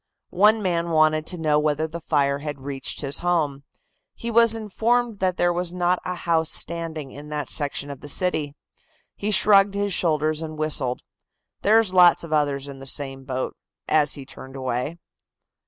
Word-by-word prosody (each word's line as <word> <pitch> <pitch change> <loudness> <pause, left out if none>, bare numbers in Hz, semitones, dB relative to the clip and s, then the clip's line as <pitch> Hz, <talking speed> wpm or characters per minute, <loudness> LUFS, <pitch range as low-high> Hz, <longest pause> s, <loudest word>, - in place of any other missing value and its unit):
One 210 +3 +4
man 170 -2 -1
wanted 155 -1 +2
to 180 - -2
know 155 -2 +2
whether 150 +1 0
the 170 +2 -8
fire 140 -3 +1
had 145 -2 -6
reached 135 0 -3
his 140 -1 -2
home. 155 -6 -1 0.5
He 235 - -5
was 230 0 +5
informed 225 +1 -1
that 185 -1 0
there 175 0 +2
was 175 0 -2
not 180 0 +1
a 180 0 -4
house 165 -2 0
standing 160 -5 0
in 145 +1 -10
that 150 -3 -4
section 145 -1 -1
of 140 - -10
the 145 - -9
city. 150 -2 0 0.6
He 205 - -3
shrugged 200 -1 +5
his 200 -1 -1
shoulders 155 -2 +1
and 155 -1 -6
whistled. 145 -5 -1 0.6
"There's 215 -2 +3
lots 180 -2 +6
of 165 -2 -5
others 145 -2 0
in 140 -1 -9
the 135 - -9
same 135 -1 -3
boat," 130 -1 -4 0.3
as 150 -2 +3
he 140 -3 -9
turned 130 0 -11
away. 130 +4 -3
155 Hz, 175 wpm, -23 LUFS, 145-180 Hz, 0.6 s, lots